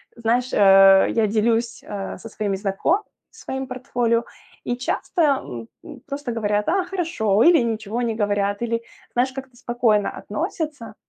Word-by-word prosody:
знаешь, 240 +2 0
э, 195 -1 +7
я 225 -2 +2
делюсь, 230 +3 0
а, 200 -2 -5
со 225 - -10
своими 205 -2 -2
знакомыми 195 - 0 0.3
своим 265 0 -5
портфолио, 245 -2 -1 0.4
и 245 - -1
часто, 260 +7 -2
м, 265 - 0 0.2
м, 285 -5 -11
просто 280 -2 -4
говорят: 210 -2 0
"А, 375 +3 +2
хорошо", 320 - +1
или 340 0 +6
ничего 225 -1 -2
не 235 -2 0
говорят, 205 -1 0
или, 230 -1 -1 0.3
знаешь, 250 +2 +1
как-то 265 -1 -9
спокойно 235 -4 +1
относятся. 300 - -5
230 Hz, 145 wpm, -22 LUFS, 210-260 Hz, 0.4 s, э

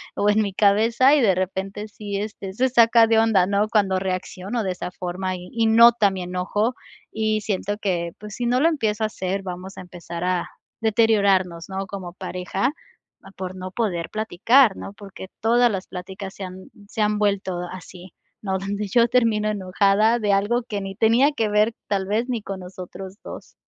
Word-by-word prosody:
o 205 - +2
en 210 +1 +3
mi 200 -2 -2
cabeza, 225 +7 +4
y 295 - +3
de 200 -6 +4
repente 190 +3 -3
sí, 205 -1 -5
este, 200 -2 -5
se 255 +6 +1
saca 235 -1 +6
de 225 0 +4
onda, 220 -5 +4
¿no? 200 +2 +1
Cuando 200 -4 +2
reacciono 185 +4 -3
de 190 - -1
esa 180 - -5
forma 185 +1 -4
y 180 0 -9
y 230 -1 +2
nota 230 -1 +6
mi 190 -1 -5
enojo, 185 +6 -1 0.4
y 215 -1 0
siento 205 0 -2
que, 175 -5 -2
pues, 210 0 -9
si 245 - -3
no 245 +1 +2
lo 325 - +5
empiezo 220 -9 -1
a - - +2
hacer, 195 -1 -3
vamos 185 +1 -7
a - - -6
empezar 175 -1 -8
a 180 -1 -1 0.3
deteriorarnos, 200 -6 +2
¿no? 190 0 -3
Como 185 -3 -7
pareja, 185 +4 -2 0.7
por 185 -1 -5
no 185 0 -7
poder 180 -6 -2
platicar, 220 +2 +3
¿no? 195 - -8
Porque 200 -2 -10
todas 240 +2 +4
las 190 -2 -4
pláticas 190 +1 -7
se 200 - -7
han 185 0 -11 0.2
se 215 - -4
han 210 0 +1
vuelto 200 -3 0
así, 185 -1 -11 0.3
¿no? 190 -2 -1
Donde 200 +2 -3
yo 235 +4 +4
termino 225 -4 +2
enojada 200 +3 +2
de 210 -2 +1
algo 210 +5 +1
que 210 -3 -4
ni 195 0 -6
tenía 230 +8 +4
que 225 -6 0
ver, 210 +2 +2
tal 195 -2 -1
vez, 225 +5 -1
ni 240 -3 -2
con 195 -2 -6
nosotros 185 +1 -9
2. - - -10
200 Hz, 190 wpm, -23 LUFS, 185-220 Hz, 0.7 s, saca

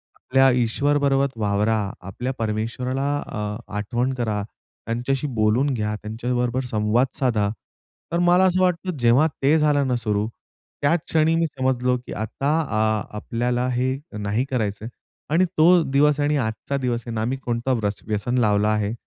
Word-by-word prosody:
आपल्या 135 +1 +3
ईश्वरबरोबर 140 +3 +2
वावरा, 105 +1 +1 0.2
आपल्या 125 +8 -4
परमेश्वराला 115 +5 -2 0.2
अ, 105 0 -4 0.2
आठवण 120 +5 -1
करा, 110 -5 -2 0.4
त्यांच्याशी 125 +5 -1
बोलून 115 +6 +2
घ्या, 105 -2 -2
त्यांच्याबरोबर 120 +3 -1
संवाद 110 +4 +2
साधा." 110 -6 +1 0.6
तर 170 - +1
मला 175 +2 +4
असं 185 0 +2
वाटतं 180 -2 0
जेव्हा 120 +6 +4
ते 145 +4 +4
झालं 145 -3 +2
ना 125 - +1
सुरू. 105 -3 -1 0.5
त्याच 160 +4 +3
क्षणी 160 0 +3
मी 165 0 +2
समजलो, 130 -3 0
की 125 - -9
आता 110 +6 -3
अ, 110 -6 0
आपल्याला 120 +3 -1
हे 130 +2 0 0.2
नाही 105 +5 -1
करायचं 110 -4 -2
आहे. - - -5 0.4
आणि 185 +3 +4
तो 170 +2 +6
दिवस 145 +1 +3
आणि 145 0 +2
आजचा 115 +3 -2
दिवस 120 -3 -2
आहे 115 - -4
ना 110 - -1
मी 130 +3 -1
कोणता 120 0 -1
व्र 110 -4 0 0.2
व्यसन 110 +4 -1
लावला 105 -2 +3
आहे, 105 -1 0
125 Hz, 155 wpm, -23 LUFS, 110-140 Hz, 0.6 s, तो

